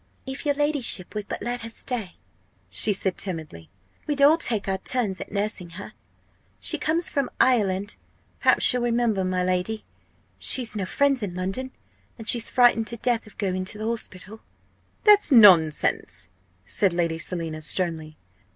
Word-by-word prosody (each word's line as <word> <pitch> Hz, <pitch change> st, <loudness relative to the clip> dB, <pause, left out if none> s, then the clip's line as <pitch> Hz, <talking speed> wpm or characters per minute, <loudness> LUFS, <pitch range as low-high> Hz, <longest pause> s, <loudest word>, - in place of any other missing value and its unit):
"If 265 Hz, +2 st, -6 dB
your 285 Hz, -, +2 dB
ladyship 290 Hz, -, -1 dB
would 210 Hz, -1 st, -5 dB
but -, -, -5 dB
let 245 Hz, 0 st, -3 dB
her 230 Hz, -, -5 dB
stay," 225 Hz, -5 st, -4 dB, 0.6 s
she 150 Hz, -, +3 dB
said 190 Hz, -2 st, -2 dB
timidly, 155 Hz, -, -5 dB, 0.4 s
"we'd 295 Hz, -2 st, -1 dB
all 295 Hz, +3 st, +7 dB
take 230 Hz, -12 st, 0 dB
our 190 Hz, 0 st, -1 dB
turns 210 Hz, -4 st, -2 dB
at -, -, -8 dB
nursing 200 Hz, -4 st, -3 dB
her. 200 Hz, -, -9 dB, 0.7 s
She -, -, 0 dB
comes 330 Hz, +2 st, +1 dB
from 280 Hz, -3 st, -1 dB
Ireland, 205 Hz, -5 st, +2 dB, 0.4 s
perhaps -, -, +4 dB
you'll 250 Hz, -, -1 dB
remember, 235 Hz, -4 st, 0 dB
my 185 Hz, 0 st, -1 dB
lady. 185 Hz, +4 st, -2 dB, 0.5 s
She's 240 Hz, -4 st, +3 dB
no 195 Hz, -3 st, -3 dB
friends 280 Hz, +1 st, +1 dB
in 190 Hz, -4 st, -4 dB
London, 195 Hz, +9 st, -3 dB, 0.5 s
and 225 Hz, -2 st, -10 dB
she's 235 Hz, -1 st, +3 dB
frightened 240 Hz, -3 st, +3 dB
to 235 Hz, -, -2 dB
death 235 Hz, -1 st, 0 dB
of 215 Hz, -, -17 dB
going 185 Hz, -3 st, -2 dB
to 205 Hz, -, -5 dB
the 215 Hz, -, -5 dB
hospital." 220 Hz, -2 st, -6 dB, 0.6 s
"That's 415 Hz, -6 st, +6 dB
nonsense!" 180 Hz, -, +4 dB, 0.3 s
said 185 Hz, -, 0 dB
Lady 170 Hz, -2 st, -1 dB
Selina, 165 Hz, -2 st, -4 dB
sternly. 160 Hz, -2 st, -2 dB
210 Hz, 160 wpm, -24 LUFS, 185-245 Hz, 0.7 s, all